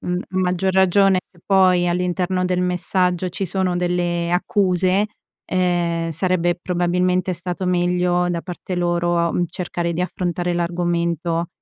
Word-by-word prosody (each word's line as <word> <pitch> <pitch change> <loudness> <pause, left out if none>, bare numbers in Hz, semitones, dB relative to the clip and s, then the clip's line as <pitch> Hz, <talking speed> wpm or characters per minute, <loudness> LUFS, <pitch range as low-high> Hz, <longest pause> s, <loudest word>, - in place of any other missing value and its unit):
mhmm, 180 0 -2
maggior 185 0 0
ragione 190 0 +4
se 180 - -26
poi 185 -2 +4
all'interno 180 +1 0
del 180 0 0
messaggio 180 0 0
ci 190 +2 -4
sono 185 0 -1
delle 175 -1 -1
accuse, 185 +1 +2 0.4
ehm, 175 -2 0
sarebbe 175 +1 0
probabilmente 180 +1 0
stato 180 +2 -4
meglio 180 0 +1
da 170 - -2
parte 180 +1 -6
loro, 175 -1 +1
mhmm, 175 - +1
cercare 175 -1 -3
di 170 - -3
affrontare 175 0 -2
l'argomento 170 -1 -1
180 Hz, 130 wpm, -21 LUFS, 175-185 Hz, 0.4 s, ragione